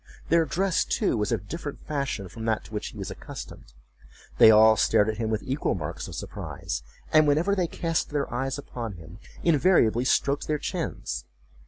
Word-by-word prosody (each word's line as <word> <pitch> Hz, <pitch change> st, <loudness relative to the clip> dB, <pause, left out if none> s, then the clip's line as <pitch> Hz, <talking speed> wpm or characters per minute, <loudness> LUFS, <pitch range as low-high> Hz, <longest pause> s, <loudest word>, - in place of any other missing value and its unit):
Their 165 Hz, 0 st, +4 dB
dress, 180 Hz, +5 st, +1 dB
too, 210 Hz, -, 0 dB
was 105 Hz, 0 st, -1 dB
of 115 Hz, -5 st, 0 dB
a -, -, -17 dB
different 145 Hz, +4 st, -6 dB
fashion 140 Hz, -9 st, -3 dB
from 110 Hz, +5 st, -9 dB
that 110 Hz, -1 st, 0 dB
to -, -, -13 dB
which 105 Hz, -, -3 dB
he -, -, -10 dB
was -, -, -5 dB
accustomed. -, -, -9 dB, 0.7 s
They -, -, +10 dB
all 110 Hz, 0 st, +7 dB
stared 105 Hz, +1 st, +3 dB
at 110 Hz, -, -3 dB
him 110 Hz, -1 st, -1 dB
with 110 Hz, -1 st, -1 dB
equal 135 Hz, -5 st, -1 dB
marks 75 Hz, -5 st, -5 dB
of -, -, -8 dB
surprise, -, -, -5 dB, 0.3 s
and 155 Hz, -1 st, +6 dB
whenever 160 Hz, +7 st, +3 dB
they 185 Hz, -3 st, +1 dB
cast 165 Hz, 0 st, -1 dB
their 145 Hz, -1 st, -1 dB
eyes 135 Hz, +2 st, -1 dB
upon 120 Hz, -6 st, -6 dB
him, 85 Hz, +3 st, -12 dB, 0.2 s
invariably 145 Hz, -, +4 dB
stroked 140 Hz, +2 st, +1 dB
their 150 Hz, -, +1 dB
chins. -, -, -4 dB
130 Hz, 190 wpm, -26 LUFS, 110-155 Hz, 0.7 s, They